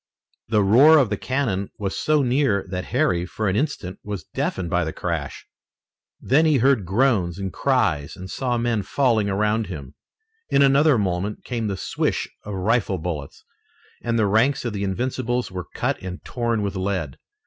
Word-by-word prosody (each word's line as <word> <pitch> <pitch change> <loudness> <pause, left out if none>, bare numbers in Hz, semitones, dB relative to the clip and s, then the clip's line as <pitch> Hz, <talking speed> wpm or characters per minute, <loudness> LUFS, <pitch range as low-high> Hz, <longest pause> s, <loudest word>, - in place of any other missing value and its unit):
The 105 -1 +2
roar 135 +11 +7
of 130 -8 +3
the - - +2
cannon 110 -5 -1
was 95 -2 -3
so 150 -2 +2
near 125 -5 +1
that 90 -1 -3
Harry, 100 - +1
for 105 +4 -3
an 95 - +1
instant, 105 - -2
was 105 -2 -5
deafened 90 -2 -2
by - - +2
the - - -3
crash. - - -4 0.7
Then 155 +5 +3
he 150 -3 +4
heard 125 -6 +2
groans 95 -5 +2
and 95 -3 -4
cries 70 -1 0
and 95 0 -8
saw 125 +4 -1
men 115 -2 0
falling 110 0 +1
around 105 +2 0
him. 75 -7 -8 0.6
In 140 - +4
another 140 0 +5
moment 100 0 -2
came 115 -3 -3
the 100 -2 -2
swish - - -1 0.2
of 105 -1 -5
rifle 100 0 +1
bullets, 80 -4 -6 0.6
and 115 -1 -1
the 110 - +3
ranks 115 +7 +2
of 120 - -2
the 100 -1 -3
Invincibles 120 +4 -2
were 90 -1 -6
cut - - -1
and 95 0 -7
torn 115 -3 -1
with 100 0 -3
lead. 95 -7 -3
105 Hz, 175 wpm, -23 LUFS, 95-125 Hz, 0.7 s, roar